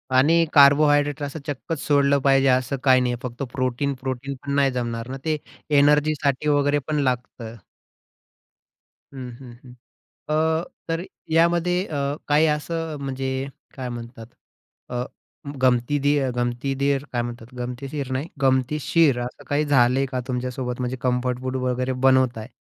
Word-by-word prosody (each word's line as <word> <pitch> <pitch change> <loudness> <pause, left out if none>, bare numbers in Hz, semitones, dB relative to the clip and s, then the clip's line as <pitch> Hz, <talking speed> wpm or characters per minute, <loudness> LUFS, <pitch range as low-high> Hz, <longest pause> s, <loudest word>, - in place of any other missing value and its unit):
आणि 165 +6 +5
कार्बोहायड्रेट 145 0 +5
असं 145 +3 -5
चक्कच 145 +2 -4
सोडलं 140 -1 +4
पाहिजे 135 0 +4
असं 130 +1 +2
काही 130 -2 +5
नाहीये. 125 -1 0
फक्त 125 +2 -5
प्रोटीन 130 +2 -1
प्रोटीन 130 +1 -4
पण 140 - -3
नाही 140 -1 +3
जमणार 120 -2 -3
ना 135 - -4
ते 155 -1 +1 0.4
एनर्जीसाठी 150 -1 +2
वगैरे 145 0 +2
पण 155 -1 0
लागतं. 120 -2 -4 1.6
हं, 130 -2 -7
हं, 130 -3 -11
हं. 125 -2 -13 0.6
अ, 160 +1 +1 0.3
तर 165 +1 -1 0.3
यामध्ये 170 +2 +2
अ, 150 - -5 0.3
काही 150 +2 +4
असं 160 +1 -2
म्हणजे 135 0 -3 0.3
काय 130 -2 -4
म्हणतात? 120 -1 -8 0.6
अ, 125 0 -2 0.6
गमती 125 +3 +2
दे 140 -1 +1
गमती 120 +3 -1
देर 140 0 0
काय 120 - 0
म्हणतात? 120 +1 -8
गमतीशीर 130 +3 -5
नाही 140 +5 -2
गमतीशीर 135 +2 +2
असं 120 +1 -7
काही 145 +1 +1
झालंय 135 -1 +3
का 130 -1 -3
तुमच्यासोबत? 125 0 -3
म्हणजे 125 +1 -2
कम्फर्ट 125 0 0
फूड 130 0 -3
वगैरे 130 0 -1
बनवत 130 -3 +4
आहे 110 +2 -7
135 Hz, 145 wpm, -23 LUFS, 125-145 Hz, 1.6 s, आणि